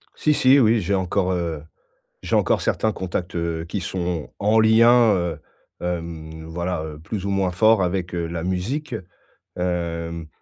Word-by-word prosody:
Si 155 - +2
si 135 +1 +5
oui, 115 -2 +4
j'ai 100 0 -1
encore, 95 0 0
heu, 85 -4 -2 0.6
j'ai - - -2
encore - - +2
certains 110 - +1
contacts, 90 -2 -4
heu, 85 -1 -2
qui 100 - -3
sont 90 -3 -3
en 105 +2 +3
lien, 115 +1 +6
heu, 85 -4 -2 0.4
hem, 80 -2 -5
voilà, 85 0 -3
heu, 75 -1 -7
plus 95 +5 -5
ou - - -1
moins 95 -2 +1
fort 110 +3 +4
avec, 90 0 -2
heu, 85 -1 -1
la 85 0 -4
musique. 105 - -2 0.6
Hem, 85 -2 -3
90 Hz, 160 wpm, -22 LUFS, 85-105 Hz, 0.6 s, lien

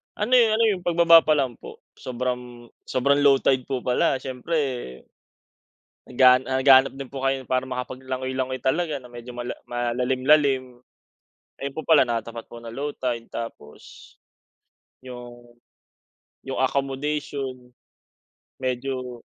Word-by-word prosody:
Ano 215 +4 -3
eh, 235 - +6
ano 230 - +2
yung 180 -2 -5
pagbaba 170 -1 +7
pa 155 - +4
lang 130 -5 -1
po, - - -12 0.2
sobrang 125 -1 -5 0.2
sobrang 140 +3 +2
low 140 -1 +7
tide 130 -2 +2
po 130 -3 -2
pala, 125 +2 +2
siyempre 130 - -3 1.0
naghan 130 0 +5
naghahanap 130 0 +5
din 135 -2 -8
po 135 - -6
kayo 135 -1 0
para 130 +1 -1
makapag 130 0 -6
langoy-langoy 130 0 -3
talaga 155 +3 0
na 125 - -14
medyo 120 0 -10
mala 120 0 -4 0.2
malalim 120 +2 -1
lalim. 140 -3 +4 0.9
Ayun 140 0 -5
po 160 - -5
pala 155 -4 +5
natapat 115 -1 -4
po 120 - -12
na 115 - -8
low 140 +5 -4
tide, 120 -3 -3
tapos, 115 -10 -9 0.9
yung 120 -1 -11 0.9
yung 135 - -5
accommodation, 135 -1 -2 0.9
medyo 130 -1 -4
130 Hz, 130 wpm, -24 LUFS, 125-140 Hz, 1.0 s, pagbaba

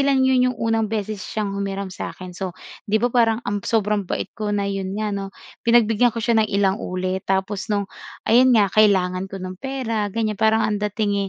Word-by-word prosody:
lang 275 -1 +3
'yon 255 -1 +4
yung 250 - -3
unang 225 -1 0
beses 215 -1 -3
siyang 205 0 -3
humiram 195 -1 -3
sa 170 - -5
akin. 185 -1 -9
So, 180 -1 -5 0.3
'di 210 - +3
ba 245 - +1
parang 230 -1 +2
ang 205 0 -2
sobrang 210 -3 0
bait - - -3
ko 215 -1 -4
na, 205 -1 0
'yon 195 -1 -3
nga 215 -1 -2
'no, 195 -1 -3 0.3
pinagbigyan 235 0 +4
ko 230 -1 -4
siya 230 -2 +3
ng 215 - +1
ilang 200 +2 +1
ulit 185 +1 -3
tapos 195 +2 -1
no'ng, 205 -1 0 0.4
ayun 250 +3 +5
nga, 200 -2 +3
kailangan 190 -3 +3
ko 195 - -7
ng 185 0 -7
pera, 230 -6 -2
ganiyan, 215 0 -2
parang 220 0 +3
ang 210 -1 -1
dating 205 -1 -1
210 Hz, 205 wpm, -22 LUFS, 195-225 Hz, 0.4 s, ayun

